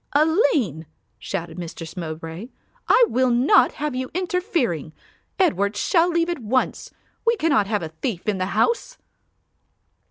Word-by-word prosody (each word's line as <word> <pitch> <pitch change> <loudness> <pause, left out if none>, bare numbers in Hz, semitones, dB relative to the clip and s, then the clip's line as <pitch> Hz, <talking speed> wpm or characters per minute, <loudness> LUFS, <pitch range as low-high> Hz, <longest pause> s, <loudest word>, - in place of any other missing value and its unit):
"Aline," 285 - +2 0.3
shouted 170 -3 -5
Mistress 165 -1 -7
Mowbray, 165 +3 -6 0.4
"I - - +6
will 255 - +1
not 245 +4 +4
have 300 -2 -3
you 255 0 -3
interfering. 355 - -1 0.4
Edward 200 - +1
shall 345 -1 +3
leave 335 -1 +1
at 345 - -2
once. 250 +3 -1 0.3
We 465 0 +3
cannot 290 - +2
have 210 -3 -1
a 160 - -4
thief 175 +5 -5
in 205 -3 0
the 185 - -1
house." 470 - +1
240 Hz, 135 wpm, -23 LUFS, -, 0.4 s, I